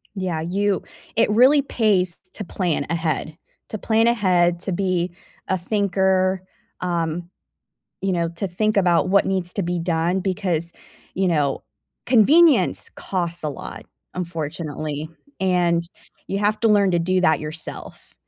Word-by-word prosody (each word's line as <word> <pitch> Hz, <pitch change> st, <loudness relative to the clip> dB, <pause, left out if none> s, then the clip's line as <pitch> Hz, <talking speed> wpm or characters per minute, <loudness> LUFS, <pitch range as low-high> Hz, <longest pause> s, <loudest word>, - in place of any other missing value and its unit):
Yeah, 180 Hz, -5 st, -2 dB
you 195 Hz, +4 st, 0 dB, 0.3 s
it 225 Hz, -, +3 dB
really 255 Hz, +7 st, +5 dB
pays 205 Hz, -9 st, +1 dB
t -, -, -25 dB
t -, -, -15 dB
to 210 Hz, -, -5 dB
plan 170 Hz, -6 st, -1 dB
ahead. 160 Hz, -1 st, -2 dB, 0.3 s
To 215 Hz, -, -4 dB
plan 225 Hz, +2 st, +2 dB
ahead, 180 Hz, -6 st, +2 dB
to 190 Hz, -, -3 dB
be 180 Hz, -1 st, 0 dB, 0.4 s
a 190 Hz, -, +1 dB
thinker, 190 Hz, -1 st, +1 dB, 0.4 s
um, 170 Hz, -1 st, -2 dB, 0.7 s
you 195 Hz, 0 st, 0 dB
know, 170 Hz, -1 st, 0 dB
to 180 Hz, +3 st, -4 dB
think 215 Hz, +4 st, 0 dB
about 180 Hz, -1 st, +3 dB
what 200 Hz, 0 st, +4 dB
needs 185 Hz, -2 st, -1 dB
to 200 Hz, -, -1 dB
be 175 Hz, +1 st, -2 dB
done 170 Hz, +2 st, 0 dB
because, 175 Hz, -3 st, -1 dB, 0.4 s
you 190 Hz, 0 st, +1 dB
know, 145 Hz, -5 st, 0 dB, 0.4 s
convenience 285 Hz, +7 st, +4 dB
costs 175 Hz, -2 st, -3 dB
a 155 Hz, -, -1 dB
lot, 140 Hz, -, -8 dB, 0.3 s
unfortunately, 155 Hz, -3 st, -4 dB, 0.3 s
and 175 Hz, -3 st, +2 dB, 0.5 s
you 195 Hz, -, -1 dB
have 210 Hz, +1 st, +1 dB
to 225 Hz, -, +3 dB
learn 205 Hz, -2 st, +4 dB
to 175 Hz, -, +3 dB
do 185 Hz, +2 st, +1 dB
that 160 Hz, -5 st, +3 dB
yourself 155 Hz, +1 st, -7 dB
180 Hz, 150 wpm, -22 LUFS, 170-200 Hz, 0.7 s, really